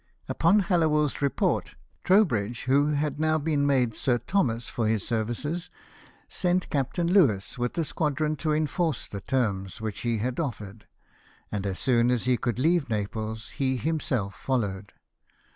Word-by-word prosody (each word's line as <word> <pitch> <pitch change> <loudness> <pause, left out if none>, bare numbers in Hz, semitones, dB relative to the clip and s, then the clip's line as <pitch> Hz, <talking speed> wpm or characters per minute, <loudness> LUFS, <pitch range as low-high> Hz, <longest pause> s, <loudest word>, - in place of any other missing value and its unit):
Upon 185 +6 +3
Hallowell's 155 -6 +1
report, 140 -1 0 0.3
Trowbridge, 120 - +2
who 140 +3 +3
had 145 0 -1
now 155 0 +2
been 145 -2 0
made 125 -5 +2
Sir 120 +2 +1
Thomas 120 - 0
for 115 -2 -1
his 110 -2 0
services, 120 +10 -2 0.6
sent 180 0 0
Captain 140 +5 0
Louis, 125 - +3
with 120 +5 -2
a 165 - +1
squadron, 155 0 -1
to 155 0 -1
enforce 155 +2 0
the 100 - -7
terms 100 -7 -1
which 110 -2 -4
he 120 -1 0
had 125 +6 -2
offered, 110 -8 -5 0.6
and 100 -1 -2
as 95 -1 -3
soon 120 -2 +3
as 125 -2 +1
he 125 0 +3
could 120 0 -2
leave 160 +1 +2
Naples 110 +1 -3
he 130 -1 -1
himself 130 -9 -1
followed. 100 -2 -2
130 Hz, 150 wpm, -27 LUFS, 110-155 Hz, 0.6 s, Upon